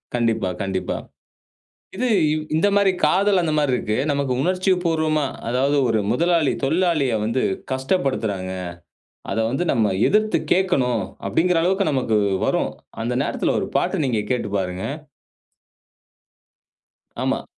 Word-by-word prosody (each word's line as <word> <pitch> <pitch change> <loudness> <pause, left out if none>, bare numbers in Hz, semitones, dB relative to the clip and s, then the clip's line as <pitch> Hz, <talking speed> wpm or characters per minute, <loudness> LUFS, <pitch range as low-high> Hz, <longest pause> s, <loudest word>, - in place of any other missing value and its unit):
கண்டிப்பா, 115 -5 +1
கண்டிப்பா. 95 -1 -2 1.0
இது 250 +4 0 0.5
இந்த 165 - +3
மாரி 200 -1 +4 0.2
காதல் 195 +3 +3
அந்த 160 - 0
மாரி 145 -3 +1
இருக்கு. 110 -2 -2
நமக்கு 140 -2 0
உணர்ச்சிபூர்வமா, 170 -4 +1 0.2
அதாவது 135 +4 +1
ஒரு 110 -1 +2
முதலாளி 170 +1 +2
தொழிலாளிய 155 -4 +1
வந்து 115 +4 0 0.3
கஷ்டப்படுத்துறாங்க. 130 - -1 0.8
அதை 115 - 0
வந்து 135 +8 -1
நம்ம 110 -2 +2 0.2
எதிர்த்துக் 215 +1 +1
கேக்கணும், 130 - +1 0.2
அப்படிங்கிற 165 - +2
அளவுக்கு 190 +2 +1
நமக்கு 125 -6 +1 0.3
வரும். - - 0 0.3
அந்த 120 +2 -1
நேரத்துல - - -1
ஒரு - - -3
பாட்டு - - 0
நீங்கக் 115 -5 -1
கேட்டுப் 105 -5 -1
பாருங்க. 90 -1 -3 2.4
ஆமா. - - -1
140 Hz, 115 wpm, -22 LUFS, 115-180 Hz, 2.4 s, மாரி